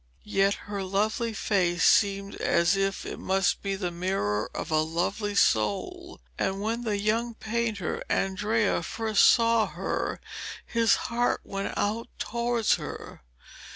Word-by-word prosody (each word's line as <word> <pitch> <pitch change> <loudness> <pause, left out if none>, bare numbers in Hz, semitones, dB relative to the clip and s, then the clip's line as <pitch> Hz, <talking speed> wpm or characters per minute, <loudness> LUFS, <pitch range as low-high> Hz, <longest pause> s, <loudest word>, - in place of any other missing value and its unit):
Yet 195 +1 +3
her 205 -1 -4
lovely 215 +5 0
face 180 -5 0
seemed 200 -1 +3
as 170 +3 +2
if 195 0 -1
it - - -6
must 190 0 +1
be 195 -1 -2
the 185 -3 -3
mirror 170 - -1
of - - -4
a 155 0 +3
lovely 180 +6 -2
soul, 105 - +1 0.2
and 195 0 0
when 225 +3 -2
the 215 -4 -1
young 225 +3 0
painter 220 -5 -2
Andrea 205 +3 +1
first 220 -2 +1
saw 230 -2 +4
her - - -3 0.5
his 230 -1 +3
heart 240 +1 0
went 195 0 -4
out 220 +3 -1
towards 235 -1 +1
her. - - -8
200 Hz, 135 wpm, -27 LUFS, 190-225 Hz, 0.5 s, saw